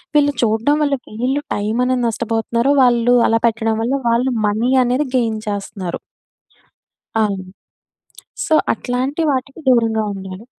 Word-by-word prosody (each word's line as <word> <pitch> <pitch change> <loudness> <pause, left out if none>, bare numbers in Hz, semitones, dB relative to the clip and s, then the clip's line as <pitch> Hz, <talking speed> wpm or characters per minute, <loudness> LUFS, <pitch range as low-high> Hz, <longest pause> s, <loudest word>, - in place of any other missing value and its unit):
వీళ్ళు 290 -1 +4
చూడడం 230 +6 +2
వల్ల 285 -1 +1 0.3
వీళ్ళు 270 +3 0
టైం 210 +2 -2
అనేది 255 -1 0
నష్టపోతున్నారు. 230 +3 0
వాళ్ళు 245 0 +3
అలా 225 - +2
పెట్టడం 225 0 0
వల్ల 245 - -1 0.2
వాళ్ళు 240 +3 +2 0.2
మనీ 225 +5 0
అనేది 260 +4 0
గెయిన్ 225 -3 0
చేస్తున్నారు. 195 -3 -4 1.2
అవును. 195 -3 -2 1.0
సో, 315 - +1 0.2
అట్లాంటి 255 +7 -2
వాటికి 275 +3 -3
దూరంగా 225 -3 +3
ఉండాలి. 190 +1 -8
235 Hz, 125 wpm, -18 LUFS, 220-255 Hz, 1.2 s, వీళ్ళు